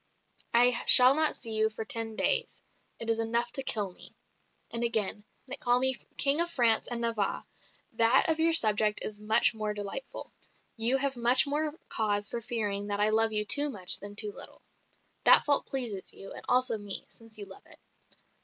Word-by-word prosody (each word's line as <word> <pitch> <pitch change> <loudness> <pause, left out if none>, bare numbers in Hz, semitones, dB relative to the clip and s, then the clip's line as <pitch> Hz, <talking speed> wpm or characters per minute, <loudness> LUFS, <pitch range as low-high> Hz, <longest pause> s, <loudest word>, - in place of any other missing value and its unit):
I 245 +1 +3
shall 255 +1 +9
not 310 +1 +3
see 230 - -7
you 220 0 0
for 220 0 -9
ten 225 -3 -2
days, 480 - -3 0.3
it 230 - -7
is 225 0 -1
enough 235 +1 -2
to 270 - -3
kill 210 -7 -2
me." - - -13 0.6
And 230 0 -4
again, 220 -3 -2 0.2
"They 260 - -5
call 245 0 0
me 260 +1 +1 0.2
King 280 +3 +3
of 340 - -2
France 235 -8 +1
and 240 -1 -3
Navarre 225 -4 -2 0.5
that 230 +3 +2
of 320 -1 -1
your 330 +1 +1
subject 215 -6 +2
is 210 -1 -6
much 220 +3 +2
more 215 -1 -6
delightful 205 - -9 0.4
you 235 +3 +1
have 275 0 -3
much 240 +2 +4
more 300 +2 -4
cause 205 -2 -1
for 235 - -6
fearing 205 -3 -3
that 205 0 -3
I 210 +1 +1
love 225 +1 +1
you 210 0 +1
too 290 +7 +4
much 195 -9 +2
than 205 +1 -12
too 210 0 -2
little. - - -12 0.6
That - - +7
fault 285 -1 +2
pleases 235 -8 -5
you, 195 - -13
and - - -12
also 250 -3 0
me, 205 -1 -3
since 225 -1 -14
you 205 - -9
love 190 -1 -14
it. - - -15
230 Hz, 190 wpm, -27 LUFS, 210-255 Hz, 0.6 s, shall